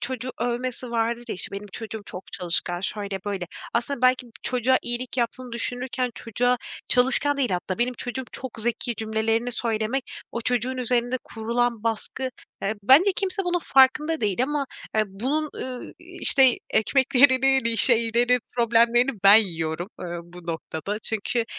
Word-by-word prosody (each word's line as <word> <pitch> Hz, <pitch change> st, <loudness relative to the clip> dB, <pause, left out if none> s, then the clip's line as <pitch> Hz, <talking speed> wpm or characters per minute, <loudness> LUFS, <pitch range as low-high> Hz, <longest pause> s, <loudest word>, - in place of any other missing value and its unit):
çocuğu 255 Hz, 0 st, -3 dB
övmesi 245 Hz, 0 st, -2 dB
vardır 235 Hz, +1 st, -1 dB
ya, -, -, -2 dB
işte, 185 Hz, -, -4 dB
benim 200 Hz, +1 st, -6 dB
çocuğum 220 Hz, -1 st, -6 dB
çok 185 Hz, -, -9 dB
çalışkan, 175 Hz, 0 st, -2 dB
şöyle, 200 Hz, 0 st, -2 dB
böyle. 195 Hz, -3 st, -3 dB, 0.3 s
Aslında 245 Hz, +2 st, -1 dB
belki 255 Hz, 0 st, +3 dB
bu 235 Hz, -, -17 dB
çocuğa 255 Hz, +1 st, +2 dB
iyilik 240 Hz, +2 st, -4 dB
yaptığını 245 Hz, +1 st, -2 dB
düşünürken 250 Hz, +1 st, -2 dB
çocuğa 245 Hz, +2 st, 0 dB, 0.3 s
çalışkan 265 Hz, +3 st, +4 dB
değil 265 Hz, -4 st, 0 dB
hatta 185 Hz, +2 st, -2 dB
"benim 250 Hz, +1 st, 0 dB
çocuğum 250 Hz, +2 st, -4 dB
çok 260 Hz, -, -5 dB
zeki" 235 Hz, +1 st, -1 dB
cümlelerini 225 Hz, +2 st, -1 dB
söylemek, 230 Hz, +2 st, -1 dB, 0.3 s
o 235 Hz, -, -3 dB
çocuğun 250 Hz, +2 st, 0 dB
üzerinde 245 Hz, 0 st, 0 dB
kurulan 235 Hz, 0 st, -1 dB
baskı, 230 Hz, +3 st, -2 dB, 0.3 s
eee, 215 Hz, +3 st, 0 dB
bence 300 Hz, -, +6 dB
kimse 390 Hz, 0 st, -1 dB
bunun 355 Hz, 0 st, +1 dB
farkında 300 Hz, +4 st, +4 dB
değil 210 Hz, +2 st, 0 dB
ama, 285 Hz, 0 st, -1 dB, 0.3 s
eee, 215 Hz, -, +4 dB
bunun 270 Hz, +11 st, -2 dB
ııı, 255 Hz, -1 st, -6 dB
i -, -, -17 dB, 0.2 s
işte 265 Hz, -3 st, +6 dB
ekmeklerini 265 Hz, +2 st, +4 dB
ni 230 Hz, 0 st, +1 dB
şeylerin, 235 Hz, +1 st, +4 dB, 0.2 s
problemlerini 235 Hz, +2 st, +4 dB
ben 200 Hz, +1 st, +10 dB
yiyorum, 170 Hz, -4 st, 0 dB
eee, -, -, -5 dB, 0.2 s
bu 175 Hz, 0 st, -14 dB
noktada. 165 Hz, +4 st, -4 dB
Çünkü 225 Hz, +2 st, -1 dB
240 Hz, 155 wpm, -24 LUFS, 220-255 Hz, 0.3 s, ben